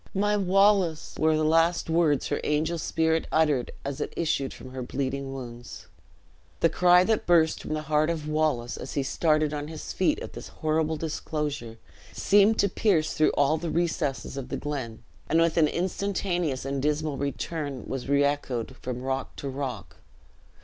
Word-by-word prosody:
'My 205 +2 +2
Wallace' 195 -4 +2
were 155 0 +3
the 155 - +1
last 165 +2 +3
words 160 -4 +2
her - - 0
angel 155 +3 0
spirit 160 0 0
uttered 150 -6 +2 0.2
as 140 -1 -4
it - - -4
issued 155 -5 0
from 130 - -10
her 130 0 -5
bleeding 135 +1 -3
wounds." 120 -2 -8 0.8
The 165 - +5
cry 180 0 +5
that 220 +2 0
burst 165 -2 +4
from 155 - -3
the 155 - -3
heart 155 +1 +2
of 160 -3 -3
Wallace, 150 -6 0
as 130 - -7
he 140 - +1
started 155 +1 +1
on 145 0 -4
his 155 -1 -7
feet 185 - +1
at - - -7
this - - -8
horrible 155 0 -1
disclosure, 150 -6 -4 0.4
seemed 205 +2 +4
to 200 - +3
pierce 180 -5 +1
through 155 - +3
all 145 +2 +3
the 170 0 -3
recessed 160 -6 -1
of 135 - -5
the - - -2
glen; 130 -7 -5 0.3
and 160 - +3
with 165 -1 +3
an 160 -2 +5
instantaneous 175 -5 -1
and 135 0 -2
dismal 150 0 0
return 140 0 -4
was 135 0 -5
re 140 0 +4
echoed 135 -4 -1
from 125 0 -5
rock 135 0 -3
to 140 - -6
rock. 135 -1 -5
155 Hz, 175 wpm, -27 LUFS, 135-165 Hz, 0.8 s, The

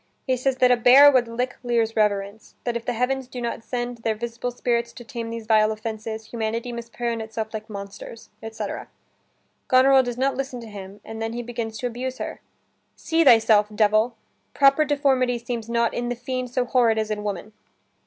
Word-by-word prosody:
He 260 - +1
says 255 +1 0
that 250 -1 +5
a 245 - +5
bear 260 +5 +8
would 250 -3 +3
lick 245 +2 -3
Lear's 230 -2 0
reverence, 205 0 -1
that 240 -1 -2
if 235 0 -4
the 245 - -1
heavens 250 +2 -1
do 250 0 -7
not 235 -1 -4
send 240 -1 -4
their 225 -1 -1
visible 235 +2 -4
spirits 235 -1 -1
to 240 - -10
tame 235 -2 -6
these 230 -1 -6
vile 215 -1 +4
offenses, 220 0 -5
humanity 230 +1 -3
must 235 -1 -7
prey 240 -1 -2
on 230 -1 -3
itself 220 0 -5
like 220 +1 -6
monsters, 200 +2 -9
etc. 225 0 -5 0.8
Goneril 265 +1 +6
does 245 -2 -4
not 270 +2 +1
listen 270 -2 -4
to 230 - -9
him, 200 -1 -10
and 225 0 -7
then 225 0 -2
he 240 +1 -4
begins 230 -2 -5
to - - -5
abuse 250 +2 -4
her: - - -6 0.5
"See 325 0 +1
thyself, 225 -5 +6
devil! 215 +2 +3 0.4
Proper 275 +2 +5
deformity 265 -4 +2
seems 235 -1 -5
not 235 0 +1
in 240 0 -2
the 245 - -2
fiend 255 +1 -4
So 250 0 0
horrid 240 -3 +3
as 215 0 -1
in 210 -1 -3
woman." 210 +1 -5
235 Hz, 200 wpm, -24 LUFS, 220-250 Hz, 0.8 s, bear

